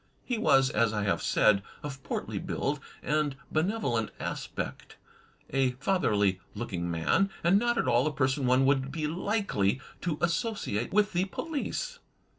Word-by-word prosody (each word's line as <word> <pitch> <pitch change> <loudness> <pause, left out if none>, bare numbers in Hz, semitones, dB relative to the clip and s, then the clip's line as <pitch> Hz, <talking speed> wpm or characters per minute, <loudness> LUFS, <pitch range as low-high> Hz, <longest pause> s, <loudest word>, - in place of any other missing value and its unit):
He 245 -3 -1
was, 135 -10 +4
as 115 0 +2
I 105 -1 0
have 100 - +1
said, 105 -2 +4 0.2
of 140 -2 -6
portly - - -3
build - - -2 0.2
and 150 -1 +1 0.2
benevolent 155 - 0
aspect; - - -5 0.5
a 135 -1 +2
fatherly 110 - +1 0.2
looking 90 -7 -3
man, 85 - +2
and 180 +4 +5
not 240 +1 +1
at - - +1
all 120 +1 +4
the 155 - +1
person 135 -1 +1
one 130 +2 +4
would 135 0 +2
be 155 +1 -2
likely 165 - 0 0.2
to 165 -4 -1
associate 170 - -1
with 210 0 +3
the 180 +2 +2
police. 330 - -4
140 Hz, 150 wpm, -29 LUFS, 120-195 Hz, 0.5 s, and